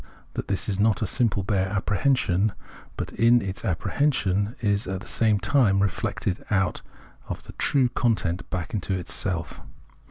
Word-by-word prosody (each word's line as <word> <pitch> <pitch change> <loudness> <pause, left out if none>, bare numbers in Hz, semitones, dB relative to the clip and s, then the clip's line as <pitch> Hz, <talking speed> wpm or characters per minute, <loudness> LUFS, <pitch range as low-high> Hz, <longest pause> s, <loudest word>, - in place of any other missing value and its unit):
that - - -4
this 95 - -1
is 100 -2 -1
not 110 +1 +3
a - - +1
simple 105 -1 +1
bare 95 -1 +1
apprehension, 100 -1 +1 0.4
but - - -4
in 120 +1 +4
its 95 -3 -5
apprehension 100 - 0
is 100 -2 0
at 95 0 -3
the 105 - -11
same 110 -3 +2
time 110 -6 +3
reflected 100 -1 -1
out 95 -3 +1 0.5
of - - -5
the - - -11
true 135 -3 +3
content 105 -9 0
back 90 +4 -4
into 95 -2 -1
itself. 90 -1 -3
100 Hz, 155 wpm, -25 LUFS, 95-115 Hz, 0.5 s, in